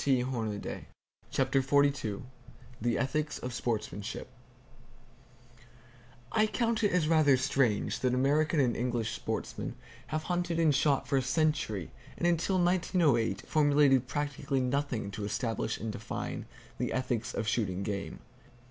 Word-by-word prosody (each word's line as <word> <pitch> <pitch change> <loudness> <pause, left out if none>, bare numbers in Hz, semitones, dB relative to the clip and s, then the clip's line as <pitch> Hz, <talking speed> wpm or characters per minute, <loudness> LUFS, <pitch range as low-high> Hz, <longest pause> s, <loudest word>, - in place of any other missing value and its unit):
[Page 130 -3 +2
382] 110 -5 -4 0.4
CHAPTER 135 0 +2
XLII 140 -6 +2 0.6
THE 120 +1 +1
ETHICS 150 +3 -1
OF 125 0 -5
SPORTSMANSHIP 110 -4 -3 2.0
I 215 0 +3
count 230 0 0
it 205 - +3
as 180 -4 +2
rather 155 -4 +5
strange 130 -5 +1
that 125 -1 +1
American 150 +4 +2
and 125 -4 +3
English 120 -2 -1
sportsmen - - -4 0.3
have 155 0 -2
hunted 175 -1 -1
and 160 -3 +4
shot 140 -1 +2
for 140 0 +2
a - - +3
century, 130 - 0 0.3
and - - -1
until 175 +2 +2
1908 175 - +2
formulated 145 -4 +4
practically 145 0 -1
nothing 125 -5 -1
to 105 +2 -5
establish 110 +2 -2
and 110 +1 -4
define - - -5 0.3
the - - -1
ethics 125 -3 -2
of 110 - -2
shooting 100 -4 0
game. 100 -1 -4
135 Hz, 130 wpm, -31 LUFS, 115-155 Hz, 2.0 s, rather